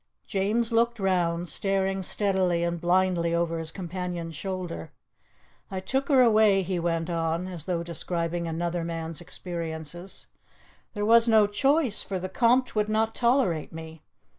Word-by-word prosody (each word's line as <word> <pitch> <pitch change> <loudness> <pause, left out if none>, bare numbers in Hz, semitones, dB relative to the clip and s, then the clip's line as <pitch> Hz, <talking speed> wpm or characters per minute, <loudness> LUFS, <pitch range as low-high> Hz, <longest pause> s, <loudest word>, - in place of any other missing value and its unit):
James 215 +4 0
looked 235 +1 +2
round, 175 -3 +1
staring 195 +1 0
steadily 185 -3 +1
and 170 -1 -2
blindly 175 -1 +2
over 170 -1 0
his 160 -1 -3
companion's 175 -2 -5
shoulder. 180 - -5 0.8
"I 190 - -3
took 265 +9 -1
her 270 -3 +6
away," 215 -4 +5
he 180 0 -2
went 165 -1 -1
on, 165 0 -1
as 175 -4 -6
though 175 -2 -1
describing 170 0 -3
another 170 +1 -2
man's 165 0 -4
experiences; 175 0 -6 0.7
"there 205 0 -1
was 230 +1 +6
no 220 -2 +6
choice, 270 +3 +1
for 195 - -4
the 185 +1 -4
Conte 245 +5 +3
would 210 -1 0
not 220 +1 +1
tolerate 235 - +1
me. 160 -1 -9
180 Hz, 145 wpm, -27 LUFS, 170-210 Hz, 0.8 s, her